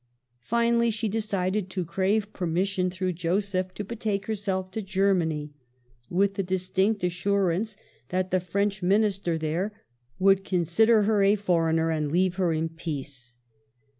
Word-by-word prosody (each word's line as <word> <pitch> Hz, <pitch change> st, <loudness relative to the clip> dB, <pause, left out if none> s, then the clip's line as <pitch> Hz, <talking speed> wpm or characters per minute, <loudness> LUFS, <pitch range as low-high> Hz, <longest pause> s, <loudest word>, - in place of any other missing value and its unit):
Finally, 235 Hz, -, +2 dB
she 225 Hz, 0 st, -1 dB
decided 200 Hz, -2 st, -1 dB
to 185 Hz, -1 st, -3 dB
crave 200 Hz, +5 st, 0 dB
permission 185 Hz, +1 st, 0 dB
through 185 Hz, 0 st, -2 dB
Joseph 185 Hz, +2 st, -1 dB
to 210 Hz, -, -4 dB
betake 205 Hz, -2 st, -3 dB
herself 195 Hz, -3 st, -2 dB
to 220 Hz, -, -3 dB
Germany, 185 Hz, -6 st, 0 dB, 0.6 s
with 195 Hz, +2 st, +2 dB
the 200 Hz, -, -1 dB
distinct 190 Hz, +2 st, 0 dB
assurance 195 Hz, +3 st, 0 dB, 0.3 s
that 185 Hz, 0 st, -1 dB
the 185 Hz, -, +3 dB
FrencH 195 Hz, +2 st, -1 dB
Minister 195 Hz, -2 st, +1 dB
there 170 Hz, +7 st, -2 dB, 0.4 s
would 195 Hz, 0 st, +4 dB
consider 200 Hz, +5 st, +3 dB
her 210 Hz, 0 st, +2 dB
a 200 Hz, +1 st, +5 dB
foreigner 165 Hz, -4 st, +1 dB
and 155 Hz, -2 st, -1 dB
leave 180 Hz, +1 st, +1 dB
her 180 Hz, -3 st, +2 dB
in 160 Hz, 0 st, 0 dB
peace. 140 Hz, -6 st, -6 dB
190 Hz, 135 wpm, -26 LUFS, 175-200 Hz, 0.6 s, a